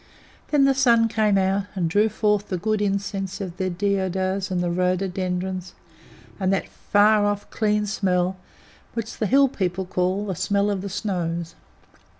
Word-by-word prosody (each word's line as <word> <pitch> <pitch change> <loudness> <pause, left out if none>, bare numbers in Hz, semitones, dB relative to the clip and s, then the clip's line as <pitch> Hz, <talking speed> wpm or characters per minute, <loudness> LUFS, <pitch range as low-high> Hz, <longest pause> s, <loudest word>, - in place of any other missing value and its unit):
Then 290 -2 +3
the 275 - +4
sun 235 -4 +4
came 215 -2 +2
out, 195 +1 +1
and 180 -3 0
drew 205 +6 +3
forth 210 -1 0
the 185 - -1
good 215 +3 -1
incense 195 -1 -2
of 185 -3 -6
the 185 0 -1
deodars 190 +1 -1
and 185 -1 -1
the 175 -1 0
rhododendrons, 185 0 -2 0.6
and 190 -1 +1
that 195 - 0
far 210 +1 +3
off, 205 0 -2
clean 210 -1 +1
smell 185 -3 0 0.6
which 230 -1 -4
the 215 - +1
Hill 275 +5 +5
people 190 -6 -2
call 185 +3 -1
"the 195 - -2
smell 200 +3 +1
of 195 -2 -2
the 200 - -5
snows." 170 -4 -3
195 Hz, 160 wpm, -23 LUFS, 185-210 Hz, 0.6 s, Hill